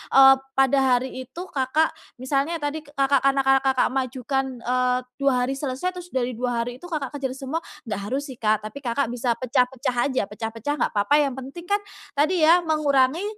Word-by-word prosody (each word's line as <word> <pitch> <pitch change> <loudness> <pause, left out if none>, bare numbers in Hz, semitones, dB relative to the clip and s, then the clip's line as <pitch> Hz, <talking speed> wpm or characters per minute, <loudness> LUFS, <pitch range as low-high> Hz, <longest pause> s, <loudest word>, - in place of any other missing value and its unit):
eee, 270 0 +9 0.2
pada 270 +1 +4 0.2
hari 255 0 -4
itu 335 +7 -7
Kakak, 305 -1 0 0.2
misalnya 275 +6 -1
tadi 295 0 -3
Kakak 275 -1 +2
karena 275 0 +2 0.2
Kakak 265 -2 +1
mengajukan, 265 -1 -2
eee, 250 0 +1 0.2
2 265 -3 +2
hari 250 - -1
selesai, 280 +6 -2
terus 360 -1 -9
dari 255 -6 -1
2 245 -2 0
hari 245 +1 -7
itu 355 - -10
Kakak 300 -6 -3
kejer 265 -1 -3
semua, 275 +4 -3 0.2
gak 210 -4 -4
harus 275 +4 -3
sih 250 - -11
Kak 215 -1 +1
tapi 215 +6 -7
Kakak 245 -1 -1
bisa 245 -1 0
pecah-pecah 255 0 0
aja, 260 -5 0
pecah-pecah 225 +6 -4
gak - - -18
papa 210 +9 +3
yang 275 -3 +1
penting 275 +7 -9
kan 410 +1 +1 0.3
tadi 310 +5 +2
ya 350 +1 +6
mengurangi, 300 0 +2
265 Hz, 185 wpm, -24 LUFS, 250-290 Hz, 0.3 s, eee